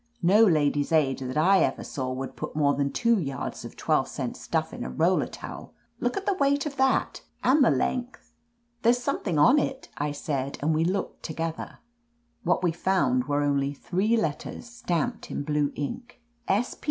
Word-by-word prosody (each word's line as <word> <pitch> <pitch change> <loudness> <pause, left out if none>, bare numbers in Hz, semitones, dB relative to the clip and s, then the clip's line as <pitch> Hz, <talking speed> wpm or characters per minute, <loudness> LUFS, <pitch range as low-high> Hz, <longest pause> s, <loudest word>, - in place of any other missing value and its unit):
"No 200 +6 +6
Ladies' 145 -6 +2
Aid 145 -5 +2
that 130 +1 -4
I 190 +5 +5
ever - - 0
saw 130 -2 -4
would 130 +1 -5
put - - -6
more 145 -2 +3
than 140 0 0
two 235 -3 +2
yards 140 -6 -4
of - - -10
twelve - - +1
cent - - -4
stuflf - - -2
in - - -5
a - - -4
roller 65 - +2
towel. - - -9 0.2
Look 245 +7 -1
at 390 - -3
the 400 - +2
weight 285 -4 +1
of 290 -2 -4
that, 265 0 +1 0.2
and 275 +3 +5
the - - +5
length 245 - -2 0.3
!" 235 0 -45
"There's 235 +1 +4
something 240 - -2
on 250 - +6
it," 270 -1 -3
I 145 +1 0
said, 140 -2 -3
and 160 +2 +2
we 155 +1 +2
looked 185 +3 -2
together. 165 0 -4 0.6
What 180 +1 +1
we 175 - +3
found 160 -8 +1
were 145 +1 0
only 140 0 0
three 200 +10 0
letters, 160 +3 -3
stamped 240 +1 -3
in - - -3
blue 150 -1 0
ink. 240 - -5
170 Hz, 185 wpm, -26 LUFS, 145-240 Hz, 0.6 s, No